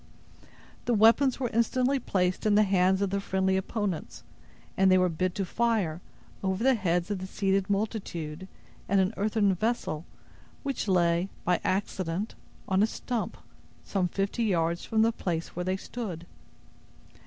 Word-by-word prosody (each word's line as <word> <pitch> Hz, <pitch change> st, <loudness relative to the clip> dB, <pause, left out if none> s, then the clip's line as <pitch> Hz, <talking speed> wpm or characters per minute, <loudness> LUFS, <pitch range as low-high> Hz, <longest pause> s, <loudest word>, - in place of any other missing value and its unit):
The 240 Hz, -, +2 dB
weapons 230 Hz, +5 st, +5 dB
were 250 Hz, -3 st, -1 dB
instantly 255 Hz, +4 st, +2 dB
placed 185 Hz, -3 st, 0 dB
in 205 Hz, -, +4 dB
the 215 Hz, -, +6 dB
hands 190 Hz, 0 st, +3 dB
of 195 Hz, -, -1 dB
the 200 Hz, 0 st, 0 dB
friendly 190 Hz, -1 st, +1 dB
opponents, 190 Hz, -, -3 dB, 0.5 s
and 190 Hz, 0 st, +4 dB
they 185 Hz, -, +6 dB
were 185 Hz, 0 st, +3 dB
bid 180 Hz, +2 st, -1 dB
to 195 Hz, -, -1 dB
fire, 200 Hz, -6 st, 0 dB, 0.4 s
over 190 Hz, +2 st, -1 dB
the 265 Hz, +1 st, +5 dB
heads 180 Hz, -4 st, 0 dB
of 200 Hz, -, -1 dB
the 185 Hz, -, -5 dB
seated 195 Hz, 0 st, 0 dB
multitude, 190 Hz, -5 st, -3 dB, 0.4 s
at 200 Hz, -, +3 dB
an 190 Hz, +2 st, +2 dB
earthen 205 Hz, -1 st, +2 dB
vessel, 185 Hz, -6 st, -2 dB, 0.6 s
which 275 Hz, -6 st, -2 dB
lay, 175 Hz, -1 st, +2 dB, 0.2 s
by 180 Hz, 0 st, +2 dB
accident, 190 Hz, 0 st, -1 dB, 0.3 s
on 190 Hz, 0 st, +2 dB
a 215 Hz, -, +4 dB
stump, 235 Hz, 0 st, -3 dB, 0.5 s
some 190 Hz, -3 st, 0 dB
fifty 200 Hz, +6 st, -1 dB
yards 170 Hz, -3 st, +1 dB
from 220 Hz, 0 st, +2 dB
the 230 Hz, -, +3 dB
place 170 Hz, -7 st, -3 dB
where 180 Hz, +1 st, -3 dB
they 185 Hz, +1 st, 0 dB
stood. 190 Hz, -6 st, -6 dB
195 Hz, 155 wpm, -28 LUFS, 180-220 Hz, 0.6 s, the